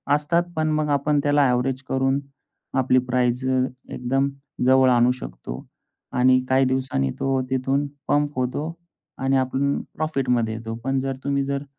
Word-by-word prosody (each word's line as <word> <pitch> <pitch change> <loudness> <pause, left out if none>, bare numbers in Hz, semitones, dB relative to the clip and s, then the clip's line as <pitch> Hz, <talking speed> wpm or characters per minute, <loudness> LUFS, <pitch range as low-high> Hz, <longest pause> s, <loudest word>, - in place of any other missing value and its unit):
असतात, 170 +4 +1
पण 155 0 +1
मग 155 0 0
आपण 145 +1 +2
त्याला 145 -2 +3
एव्हरेज 125 +1 0
करून 135 +1 +1 0.6
आपली 130 0 +4
प्राईस 125 0 +1
एकदम 130 +1 -1 0.4
जवळ 130 0 +5
आणू 120 0 +4
शकतो. - - -7 0.5
आणि 130 +1 +4
काही 130 +1 +4
दिवसांनी 130 - 0
तो 135 -1 +1
तिथून 135 +2 0 0.2
पंप 145 0 +1
होतो 145 +6 -2 0.4
आणि 135 +1 +1
आपण 135 +2 0
प्रॉफिट 150 -5 -2
मध्ये 115 -3 +1
येतो. 115 0 -5
पण, 135 +1 0
जर 135 0 -2
तुम्ही 140 0 0
जर 140 0 -2
130 Hz, 150 wpm, -23 LUFS, 125-140 Hz, 0.6 s, जवळ